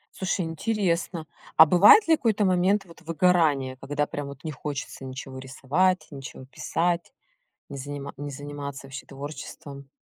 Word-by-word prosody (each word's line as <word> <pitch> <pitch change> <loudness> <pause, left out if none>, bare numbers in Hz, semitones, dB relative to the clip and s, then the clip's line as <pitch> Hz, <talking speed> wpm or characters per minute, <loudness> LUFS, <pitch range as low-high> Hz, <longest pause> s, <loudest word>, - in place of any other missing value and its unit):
Слушай, 190 -1 -1
интересно, 170 -1 -1 0.3
а 160 - +11
бывает 200 - +7
ли 325 -1 +5
какой-то 215 -5 +1
момент 190 +2 +3
вот 170 -1 -16
выгорания, 160 -6 +2
когда 145 +2 -1
прям 145 -1 -5
вот 140 +2 -11
не 155 - -3
хочется 140 -1 -6
ничего 130 0 -7
рисовать, 145 +8 0
ничего 135 -2 -9
писать, 170 - -2 0.6
не 140 - -7
занима 140 +1 -6
не 145 0 -5
заниматься 140 0 -7
вообще 135 -1 -8
творчеством? 140 0 -9
150 Hz, 145 wpm, -26 LUFS, 140-180 Hz, 0.6 s, а